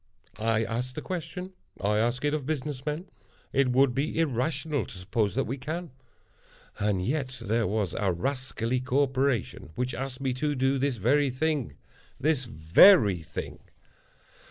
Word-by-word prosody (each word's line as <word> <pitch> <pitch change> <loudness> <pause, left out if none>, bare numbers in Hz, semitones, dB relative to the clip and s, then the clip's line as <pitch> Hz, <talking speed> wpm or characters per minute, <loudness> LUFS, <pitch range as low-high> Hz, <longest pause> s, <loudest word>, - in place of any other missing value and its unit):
I 110 0 +2
ask 120 +3 -3
the 155 - -4
question. 180 +1 -5 0.3
I 105 +1 +1
ask 120 +5 0
it 145 - +1
of 145 -3 -2
business 145 -3 -3
men. 150 +5 -2 0.5
It 135 -1 +3
would 130 0 +4
be 140 +6 -1
irrational 145 -1 0
to - - -9
suppose 100 +3 -1
that 135 - +2
we 130 +3 -4
can. 160 +5 -5 0.9
And 100 -3 0
yet 130 -1 -2
there 115 +1 0
was 100 -3 -1
a 100 -4 +1
rascally 125 +4 -2
corporation 130 - 0
which 125 +1 -2
asked 135 0 -5
me 135 -2 -1
to 145 +3 -1
do 135 +1 +1
this 135 -2 0
very 135 +7 +3
thing—this 135 - -2
very 100 - +6
thing! 80 - -6
130 Hz, 150 wpm, -28 LUFS, 115-145 Hz, 0.9 s, very